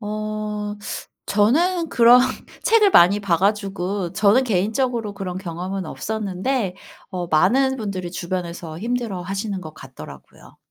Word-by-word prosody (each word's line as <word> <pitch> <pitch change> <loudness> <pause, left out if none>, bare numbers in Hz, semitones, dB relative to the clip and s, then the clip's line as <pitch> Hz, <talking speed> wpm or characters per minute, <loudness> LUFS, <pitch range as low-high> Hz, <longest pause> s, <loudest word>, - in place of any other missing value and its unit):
어 210 -1 -4 0.5
저는 330 - +2
그런 240 -1 +6 0.4
책을 440 -3 +4
많이 200 - +6
봐 180 -4 +1
가지고 195 -2 -1
저는 215 +6 +4
개인적으로 220 +1 -1
그런 185 -2 -5
경험은 185 +1 -5
없었는데 210 +1 -2 0.4
어 180 -2 -4
많은 255 - +3
분들이 195 -6 -4
주변에서 170 -2 -5
힘들어하시는 200 -3 -3
것 155 -3 -9
같더라고요. 130 -12 -13
200 Hz, 285 characters per minute, -22 LUFS, 180-230 Hz, 0.5 s, 그런